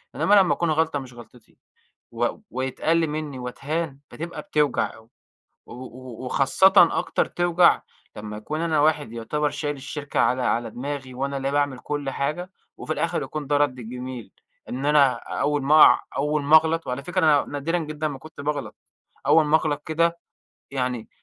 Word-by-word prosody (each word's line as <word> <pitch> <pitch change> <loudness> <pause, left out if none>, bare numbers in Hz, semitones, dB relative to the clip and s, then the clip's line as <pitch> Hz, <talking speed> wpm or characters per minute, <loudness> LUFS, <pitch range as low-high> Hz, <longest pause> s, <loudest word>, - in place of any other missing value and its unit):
إنّما 205 - +2
لمّا 190 -3 +5
أكون 170 - -1
غلطة 160 -1 +1
مش 130 -2 -10
غلطتي 120 0 -16 0.6
و 120 +1 0 0.2
ويتقَل 155 +6 0
مِنّي 150 -3 -4
واتهان 140 +4 -4
بتبقى 165 -1 -6
بتوجع 150 -3 0
أوي، 110 0 -18 0.6
و - - -12
و 130 -1 -10
وخاصةً 140 +9 +4 0.3
أكتر - - 0
توجع 175 0 +3 0.3
لمّا 105 0 -7
أكون 150 +9 -4
أنا 160 -3 +1
واحد 150 -5 +1
يُعتبر 145 +6 -2
شايل 145 0 -3
الشركة 140 +1 -4
على 130 +1 +2
على 115 -1 0
دماغي 130 +1 -6
وأنا 140 +2 -3
اللي 135 0 -2
باعمل 145 -2 0
كل 145 0 -4
حاجة 155 +7 -3 0.3
وفي 155 - -4
الآخر 165 +2 -1
يكون 150 -2 -5
ده 145 +1 +2
رد 145 -3 +1
الجِميل، 125 -2 -7 0.4
إن 130 +3 -3
أنا 145 -3 +5 0.3
أوّل 145 -1 +1
ما 150 +3 +5
أقع - - +7 0.2
أوّل 150 +1 0
ما 150 +3 +6
اغلط 160 +1 +2
وعلى 125 +2 -4
فكرة 180 - -4
أنا 150 -3 +4
نادرًا 145 +5 -1
جدًا 155 -1 -3
ما 140 -2 -7
كنت 155 +1 -12
باغلط 145 0 -3 0.5
أوّل 160 - +5
ما 150 +1 +5
اغلط 150 -2 -2
كده، 170 +2 +1 0.5
يعني 125 -4 -3
145 Hz, 170 wpm, -24 LUFS, 130-155 Hz, 0.6 s, أقع